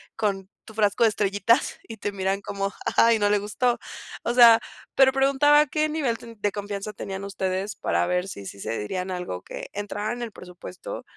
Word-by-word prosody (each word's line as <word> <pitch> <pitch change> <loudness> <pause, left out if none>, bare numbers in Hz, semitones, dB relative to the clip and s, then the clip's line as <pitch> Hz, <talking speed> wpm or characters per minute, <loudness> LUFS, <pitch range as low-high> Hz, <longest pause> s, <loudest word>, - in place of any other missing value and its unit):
con 195 -3 -1 0.2
tu 220 - -12
frasco 205 0 +2
de 225 - +6
estrellitas 205 +4 +1
y 225 - -8
te 205 0 -3
miran 195 0 -1
como, 200 -1 -3
ajá, 230 0 +4
y 225 - +1
no 205 0 +2
le 210 - +3
gustó, 235 +4 0 0.4
o 235 - 0
sea, 235 -2 +8 0.4
pero 265 -1 +6
preguntaba 275 +2 +4
a - - +3
qué 305 +2 0
nivel 285 -7 -1 0.2
de 205 0 0
confianza 205 +1 -5
tenían 195 -1 -6
ustedes 190 0 -3
para - - 0
ver 180 +1 0
si 100 - -8
sí 100 - -8
se 115 - -3
dirían 180 - -3
algo 180 - -4
que - - -8
entrara 205 +2 -3
en 245 - -7
el 235 -2 -4
presupuesto 185 - -9
205 Hz, 200 wpm, -25 LUFS, 195-235 Hz, 0.4 s, sea